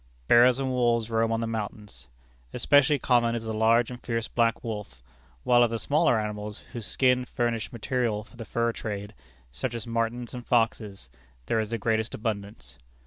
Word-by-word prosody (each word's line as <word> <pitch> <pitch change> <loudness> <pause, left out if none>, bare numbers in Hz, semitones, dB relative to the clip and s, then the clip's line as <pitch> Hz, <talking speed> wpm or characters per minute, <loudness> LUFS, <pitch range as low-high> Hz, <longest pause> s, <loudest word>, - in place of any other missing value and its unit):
Bears 120 +1 +6
and 135 -1 -1
wolves 120 -2 +1
roam 115 0 +1
on 115 0 0
the - - -1
mountains. 105 - -6 0.5
Especially 145 +1 +4
common 120 -3 +2
is 115 - -4
the 110 -1 -4
large 115 +2 +3
and 125 - -8
fierce 115 -2 -2
black 115 -1 +1
wolf; 105 - -6 0.4
while 120 -1 +5
of 120 - +4
the 115 - -2
smaller 145 -1 +2
animals, 105 -1 -5
whose 115 -3 -5
skins 125 -1 +2
furnish 120 -2 -2
material 120 -2 -1
for 120 - -20
the 120 - -7
fur 115 +1 0
trade, 105 -2 -6 0.4
such 120 - -3
as 115 - -4
martins 115 +1 -2
and 125 -1 -8
foxes, 115 -4 0 0.3
there 115 - 0
is 110 -1 -2
the 115 - -2
greatest 110 +1 -1
abundance. 100 - -5
115 Hz, 180 wpm, -27 LUFS, 110-120 Hz, 0.5 s, Bears